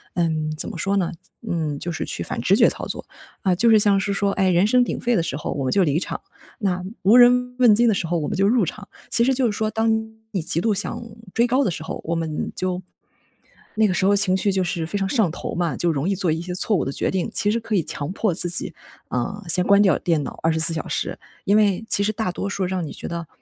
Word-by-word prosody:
嗯， 155 -3 0
怎 - - -2
么 - - -7
说 195 +4 0
呢 180 -3 0
怎 - - -29 0.2
嗯， 155 -4 -2
就 175 - -4
是 160 - -4
去 - - -5
反 - - -4
直 - - +2
觉 - - +6
操 - - -5
作。 - - -6 0.4
啊， 185 -2 +2
就 230 +6 +3
是 220 -1 +6
像 205 -1 +4
是 200 +1 -1
说， 200 0 0
哎， 190 -2 +1
人 180 +3 +3
声 250 +2 +4
鼎 - - -3
沸 240 0 +1
的 170 - +1
时 140 -4 -3
候 - - -4
我 140 - -3
们 130 - -1
就 195 - +3
离 150 -1 +1
场， - - -5 0.4
那 185 -3 -1 0.2
无 205 +5 +5
人 250 0 +5
问 235 -4 +6
津 235 +3 +3
的 220 - +4
时 185 - -2
候 170 +1 0
我 150 - -3
们 - - -3
就 195 - +3
入 220 -1 +3
场。 205 +4 -8 0.2
其 235 - +2
实 265 +2 +3
就 255 0 +1
是 220 - +1
说， 215 0 -1
当 225 +1 0 0.4
你 190 - -2
极 165 +1 +1
度 215 +2 +1
想 210 +4 -2 0.3
追 235 +1 +2
高 260 +3 +2
的 195 - 0
时 155 - -6
候， 160 - -6
我 165 - -2
们 160 -2 -3
就 185 0 -2 1.0
那 220 - +4
个 185 - 0
时 175 - +1
候 200 +1 +4
情 195 -2 +5
绪 200 +1 +1
就 190 -1 +1
是 175 -2 -2
非 200 +5 -3
常 195 - -1
上 220 -9 +2
头 170 - -6
嘛， 170 -2 -1
就 175 - 0
容 150 +4 -1
易 195 - +1
做 185 -3 0
一 160 - -1
些 180 +1 -5
错 205 +2 +1
误 - - -1
的 135 - -2
决 - - -1
定。 185 -2 -1
其 205 - +3
实 230 - 0
可 220 -1 -3
以 175 - +2
强 145 +2 -4
迫 210 -3 0
自 175 0 0
己， 170 - -1 0.4
啊， 200 +12 -3
先 180 +1 +4
关 200 0 +6
掉 190 -3 +3
电 160 -4 0
脑 - - -8
24 160 0 +3
小 160 - -4
时。 - - -3 0.3
因 200 +2 +4
为 210 0 +2
其 - - +3
实 215 - +1
大 220 -4 -2
多 195 +2 -4
数 195 -1 -2
让 180 -2 -2
你 - - -8
觉 - - -8
得 170 -1 -5
190 Hz, 295 characters per minute, -22 LUFS, 170-215 Hz, 1.0 s, 觉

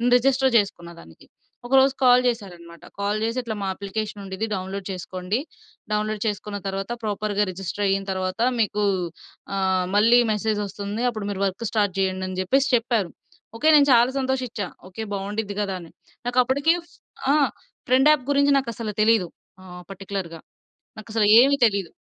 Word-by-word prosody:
Register 265 +1 +3
చేసుకున్న 195 -5 -1
దానికి. 80 - -17 0.4
ఒకరోజు 265 +1 +4
కాల్ 250 0 +6
జేశారనమాట. 175 -8 -4 0.2
కాల్ 200 +1 0
చేసి 230 +2 -1
"ఇట్లా 225 -2 -4
మా - - -2
అప్లికేషన్ 205 +2 -5
ఉండిద్ది 190 +3 -3
డౌన్‌లోడ్ 190 +1 -5
చేసుకోండి. 185 +3 -3 0.5
డౌన్‌లోడ్ 215 0 -1
చేసుకున్న 205 0 -3
తర్వాత 195 +3 -4
ప్రాపర్‌గా 210 -1 -1
రిజిస్టర్ 195 +2 -5
అయిన 195 0 +1
తర్వాత 185 +2 -3 0.2
మీకు 210 -1 +1 0.7
ఆహ్, 190 -1 +1
మళ్ళీ 230 +4 +6
మెసేజ్ 215 0 -1
ఒస్తుంది 205 +3 -5
అప్పుడు 215 -4 -5
మీరు 195 -1 -5
వర్క్ 195 +4 -3
స్టార్ట్ 205 -4 +1
జేయండి" 190 -1 -1
అని 185 0 -6
జెప్పేసి 270 +9 +2
చెప్పారు. 230 -6 -1 0.4
ఓకే 305 +7 +2
నేను 290 -1 +6
చాలా 240 +1 +5
సంతోషిచ్చా. 260 -5 -2 0.2
ఓకే 185 +4 -8
బావుండిద్ది 205 +1 -3
గదా! 200 -2 -1
అని 170 -2 -12 0.4
నాకప్పుడుకి 260 +5 +2 0.2
ఫ్ - - -23 0.4
ఆ! - - +5 0.5
ఫ్రెండ్ 265 +4 +5
యాప్ 300 -4 +2
గురించి 280 0 +3
నాకసలు 230 -4 -3
తెలీదు 215 -4 +3 0.3
ఆహ్, 180 -1 -11
పర్టిక్యులర్‌గా. 195 -3 -6 0.6
నాకసలు 215 0 0
ఏమి 275 +3 +4
తెలీదు 200 -6 +1
210 Hz, 150 wpm, -23 LUFS, 195-240 Hz, 0.7 s, కాల్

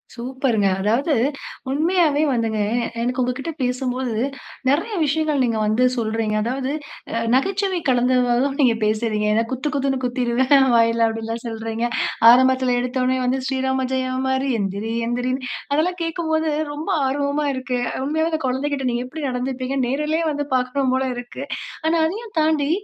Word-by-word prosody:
சூப்பருங்க. 245 -4 0
அதாவது 235 - +1 0.6
உண்மையாவே 310 0 +2
வந்துங்க, 225 -3 0 0.4
எனக்கு 250 +2 0
உங்ககிட்ட 260 +6 -3
பேசும்போது 250 -1 -1 0.5
நெறைய 315 +11 +1
விஷயங்கள் 300 -1 +1
நீங்க 230 -3 0
வந்து 215 +4 +2
சொல்றீங்க. 220 -1 -1
அதாவது 260 +3 -2 0.6
நகைச்சுவை 385 +5 +1
கலந்தவாறுதான் 250 +2 +2
நீங்க 240 -4 +4
பேசுறீங்க. 215 -1 0
ஏன்னா, 225 +1 +3
"குத்து 260 +3 -2
குத்துன்னு 270 -1 0
குத்திருவேன் 255 +2 +3
வாயில." 230 0 +4
அப்படின்லாம் 225 +1 -4
சொல்றீங்க. 225 +1 -3 0.5
ஆரம்பத்தில 260 0 +4
எடுத்தோனே 255 +1 0
வந்து, 255 +2 +1
"ஸ்ரீராம 265 -1 0
ஜெயம் 260 0 -1
மாரி 265 +1 0
எந்திரி 200 +3 -2
எந்திரின்னு" 250 +2 -2 0.2
அதெல்லாம் 350 +5 +1
கேட்கும்போது 320 -1 -1 0.2
ரொம்ப 300 +2 -5 0.2
ஆர்வமா 285 +2 0
இருக்கு. 260 -1 -3 0.3
உண்மையாவே, 315 +3 0
அந்த 315 0 -1
குழந்தகிட்ட 275 +2 -1
நீங்க 240 +1 -1
எப்படி 295 +3 -7
நடந்துப்பீங்க? 255 +1 -3
நேரிலே 300 +5 0
வந்து 290 0 -2
பார்க்கணும் 255 +1 0
போல 260 - +1
இருக்கு. 245 +2 -7 0.4
ஆனா 330 +1 +3
அதையும் 430 +7 -4
தாண்டி, 310 -2 +2
260 Hz, 135 wpm, -21 LUFS, 240-285 Hz, 0.6 s, நீங்க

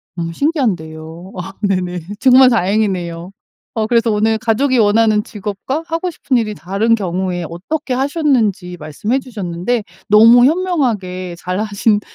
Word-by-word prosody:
너무 165 -1 -4
신기한데요. 175 - -2
아 190 +2 -6
네네. 180 -3 -1 0.2
정말 260 0 +6
다행이네요. 185 -5 -1 0.4
어 220 -1 -1
그래서 230 -1 +2
오늘 220 +1 +1
가족이 245 +4 +1
원하는 215 0 +3
직업과 210 - -5
하고 330 +2 -2
싶은 270 -4 -2
일이 220 -3 0
다른 200 +7 0
경우에 180 -3 -3
어떻게 255 - -4
하셨는지 250 - 0
말씀해 175 - -2
주셨는데 210 -1 -3 0.3
너무 230 +4 +7
현명하게 235 - -1
잘 180 +2 -3
하신 210 0 +1
210 Hz, 325 characters per minute, -17 LUFS, 180-245 Hz, 0.4 s, 너무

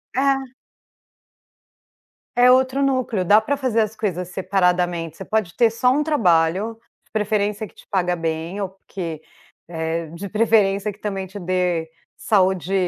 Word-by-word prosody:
É. 270 -1 +1 1.8
É 245 +1 +6
outro 260 +2 +3
núcleo, 255 -8 0
dá 205 +4 +6
para 275 +6 -1
fazer 255 -5 +1
as 215 0 -2
coisas 180 -5 -3
separadamente, 180 -3 0
você 195 - -7
pode 210 -4 -1
ter 235 -2 +4
só 250 +3 +2
um 295 - +1
trabalho, 200 - +2 0.3
de - - -34
preferência 210 0 -1
que - - -23
te - - -17
paga 180 -3 0
bem 165 +3 -3
ou 195 - -2
porque, 180 -4 -7 0.5
eh, 165 0 -3
de 170 +6 -7
preferência 210 -1 +2
que 200 - -16
também 195 -3 -4
te 195 +3 -10
dê 180 -3 -1 0.3
saúde 190 -2 +1
195 Hz, 150 wpm, -21 LUFS, 175-225 Hz, 1.8 s, É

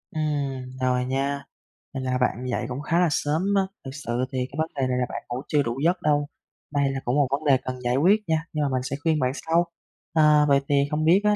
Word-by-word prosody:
Ừm, 140 -4 -2
rồi 125 -1 +1
nha. 140 +2 -1 0.5
Vậy 135 -1 -4
là 130 0 0
bạn 125 0 0
dậy 120 - -1
cũng 130 +3 -4
khá 165 +3 +1
là 180 - +4
sớm 150 +2 0
á, 195 - +5 0.2
thực 135 - -5
sự 130 -4 -2
thì 130 - -3
cái - - -10
vấn 160 +1 0
đề 135 -2 0
này 125 0 0
là 125 - +1
bạn - - -5
ngủ 120 +1 -3
chưa 145 -1 +2
đủ 120 +1 -3
giấc 175 +3 +2
đâu. 145 -1 +2 0.5
Đây 140 -1 +2
là 135 - -3
cũng 120 - +1
một 145 -2 +3
vấn 140 +3 -1
đề 140 -3 +5
cần 130 0 -5
giải 120 0 +1
quyết 195 +9 +4
nha, 160 0 +1
nhưng 155 - -1
mà 145 - +1
mình 130 -1 -1
sẽ 130 - -3
khuyên 160 -2 +2
bạn 125 -2 +1
sau. 165 +3 +1 0.5
Ờ, 150 -2 +5
vậy 140 -1 +5
thì 145 - +3 0.2
không 155 +1 0
biết 180 +5 +5
á 210 0 +4
140 Hz, 260 wpm, -25 LUFS, 130-155 Hz, 0.5 s, á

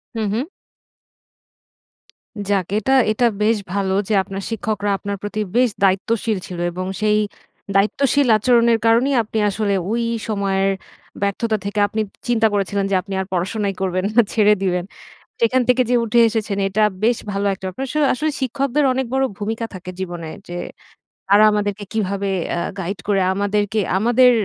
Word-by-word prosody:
হুম, 220 -2 -1
হুম। 240 +5 -1 2.0
যাক 195 -3 +1
এটা, 220 +5 +1 0.2
এটা 230 +3 +1 0.2
বেশ 220 +1 +3 0.2
ভালো 195 -1 0 0.2
যে - - +1
আপনার 195 +1 -6
শিক্ষকরা 215 -2 -2
আপনার 200 0 -4
প্রতি 205 +1 -4 0.2
বেশ 250 0 +4
দায়িত্বশীল 205 +3 +1
ছিল। 180 -2 -7
এবং 185 +2 -4 0.2
সেই 210 0 +3 0.6
দায়িত্বশীল 275 +7 +2
আচরণের 235 0 +3
কারণেই 240 +5 +3
আপনি 220 +1 -5
আসলে 205 0 -1 0.2
ঐ - - -1 0.4
সময়ের 195 -2 +1 0.5
ব্যর্থতা 215 +2 0
থেকে 205 +1 -2
আপনি 215 +2 -2 0.3
চিন্তা 230 -2 +3
করেছিলেন 200 0 0
যে - - +3
আপনি 195 +1 -8
আর - - -4
পড়াশোনাই 200 +3 -1
করবেন 185 0 0
না, 240 - +8
ছেড়ে 210 -2 +5
দিবেন। 180 -2 0 0.6
সেখান 255 +3 +3
থেকে 250 0 +4
যে 250 - +3
উঠে 230 +1 +2
এসেছেন 215 -2 -2
এটা 215 +3 +1 0.2
বেশ 235 +1 +3
ভালো 200 +1 -2
একটা 190 0 -8
ব্যাপার। 185 +8 -5
অবশ্য 265 - -8 0.2
আসলে 305 +4 -1
শিক্ষকদের 275 +2 0
অনেক 265 +1 -1
বড় 265 0 +2
ভূমিকা 220 +2 -3
থাকে 185 0 -7
জীবনে 175 -3 -5 0.2
যে, 175 - -5 0.7
তারা 205 +2 +6
আমাদেরকে 205 0 -1
কীভাবে 200 -2 -1 0.2
অ্যা 170 - -1 0.2
গাইড 190 +2 -4
করে 200 -2 +2
আমাদেরকে 205 +1 0 0.2
আমাদের 245 +4 +5
210 Hz, 155 wpm, -20 LUFS, 195-230 Hz, 2.0 s, না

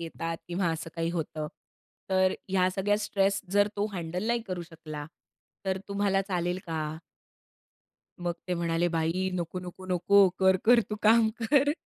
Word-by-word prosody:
येतात 165 0 -4
किंवा 175 +1 0
असं 160 0 -5
काही 165 0 0
होतं. 155 -2 -3 0.6
तर 185 0 +4 0.2
ह्या 185 -1 +3
सगळ्या 200 +2 +1
स्ट्रेस 195 0 +2
जर 205 0 +4
तो 205 +1 +1
हँडल 180 +2 -3
नाही 235 0 +1
करू 180 -1 -3
शकला, 155 -3 -8 0.6
तर 190 0 0
तुम्हाला 200 -1 +1
चालेल 180 -2 -1
का?" 160 -1 -3 1.2
मग 175 0 -1 0.2
ते 180 - +1
म्हणाले 170 0 +1
बाई 165 +4 0
नको, 175 +1 -3
नको, 180 +1 -9
नको. 195 +2 +5
कर-कर 190 +6 +5
तू 210 - -3
काम 220 +1 +6
कर. 285 +4 +4
185 Hz, 150 wpm, -28 LUFS, 165-200 Hz, 1.2 s, काम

